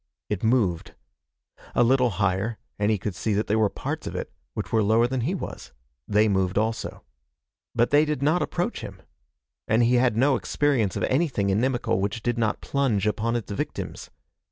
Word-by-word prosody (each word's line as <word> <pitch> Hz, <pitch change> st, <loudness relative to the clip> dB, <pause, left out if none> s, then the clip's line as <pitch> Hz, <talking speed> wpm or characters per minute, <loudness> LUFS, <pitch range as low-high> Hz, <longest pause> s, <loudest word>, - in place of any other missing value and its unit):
It 105 Hz, -3 st, -2 dB
moved. 110 Hz, -8 st, +1 dB, 0.8 s
A -, -, +5 dB
little 125 Hz, +1 st, +4 dB
higher, 100 Hz, +3 st, 0 dB, 0.2 s
and 105 Hz, +1 st, +2 dB
he 110 Hz, -, +2 dB
could 100 Hz, +1 st, -4 dB
see 110 Hz, +4 st, -1 dB
that 105 Hz, -, +1 dB
there 110 Hz, +2 st, +1 dB
were 105 Hz, -2 st, +3 dB
parts -, -, -5 dB
of -, -, -5 dB
it -, -, -4 dB, 0.2 s
which -, -, -4 dB
were 110 Hz, -, +3 dB
lower 110 Hz, +3 st, +4 dB
than 125 Hz, 0 st, -1 dB
he 165 Hz, +11 st, -1 dB
was. 180 Hz, -, -7 dB, 0.3 s
They 105 Hz, +1 st, +3 dB
moved 95 Hz, -2 st, +1 dB
also. 110 Hz, +2 st, -2 dB, 0.7 s
But 120 Hz, 0 st, +2 dB
they 145 Hz, +1 st, +6 dB
did 150 Hz, -3 st, -2 dB
not 160 Hz, +5 st, +3 dB
approach -, -, -2 dB
him. -, -, -9 dB, 0.6 s
And 110 Hz, +2 st, +3 dB
he 120 Hz, +1 st, +4 dB
had 120 Hz, -3 st, +2 dB
no 135 Hz, +2 st, +4 dB
experience 125 Hz, -9 st, 0 dB
of -, -, -2 dB
anything 130 Hz, -9 st, +1 dB
inimical 115 Hz, 0 st, +1 dB
which 105 Hz, +3 st, -2 dB
did 120 Hz, -1 st, 0 dB
not 110 Hz, -2 st, 0 dB
plunge 125 Hz, -8 st, 0 dB
upon 110 Hz, +2 st, 0 dB
its 115 Hz, -3 st, -3 dB
victims. 100 Hz, -, -5 dB
115 Hz, 185 wpm, -25 LUFS, 105-125 Hz, 0.8 s, they